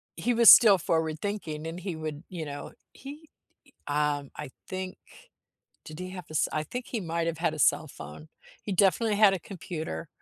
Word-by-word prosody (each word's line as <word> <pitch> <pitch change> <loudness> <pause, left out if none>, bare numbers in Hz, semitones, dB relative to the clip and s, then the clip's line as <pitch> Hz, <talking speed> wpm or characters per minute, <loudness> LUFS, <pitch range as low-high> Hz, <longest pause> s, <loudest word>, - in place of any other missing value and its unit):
he 245 - 0
was 230 -1 +7
still 210 -5 +9
forward 160 -2 -1
thinking 165 -7 -4
and 165 +2 -5
he 180 -2 -5
would, 155 0 -6
you 170 -4 -5
know, 145 0 -7 0.2
he 295 +3 -11 0.6
i 150 0 +1
um, 140 - -13
I 150 -3 -6 0.2
think 185 0 -5 0.9
did 155 +2 -10
he 185 0 -6
have 185 -2 -8
a - - -11
s 155 - +1
I 155 - -1
think 245 - -6 0.2
might 165 0 -2
have 165 -1 -3
had 165 -2 0
a - - -8
cell 160 - +3
phone. 155 +2 -11 0.3
He 205 - -4
definitely 205 +4 +3
had 205 -2 +6
a - - -2
computer, 160 - -6
170 Hz, 195 wpm, -28 LUFS, 155-195 Hz, 0.9 s, still